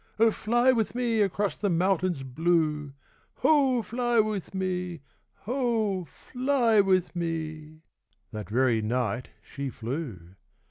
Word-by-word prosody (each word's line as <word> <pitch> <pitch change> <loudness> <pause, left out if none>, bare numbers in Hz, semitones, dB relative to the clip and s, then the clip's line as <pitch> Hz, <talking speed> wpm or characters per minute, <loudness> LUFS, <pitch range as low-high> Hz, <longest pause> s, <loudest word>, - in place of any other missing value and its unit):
Oh, 225 +1 +5
fly 240 +4 +2
with 230 -2 0
me 235 -3 +1
Across 200 0 0
the 205 - 0
mountains 180 -3 +1
blue! 150 0 0 0.4
Hoh, 270 -6 +3
fly 240 +2 0
with 210 -3 -1
me! 180 -4 -2 0.4
Hoh, 225 -6 0
fly 250 - +1
with 185 -2 +1
me! 155 -2 -4 0.2
' 105 0 -44
That 105 -3 -7
very 120 0 +2
night 120 +1 -1
she 140 -1 -5
flew. 115 - -6
180 Hz, 125 wpm, -27 LUFS, 145-225 Hz, 0.4 s, Oh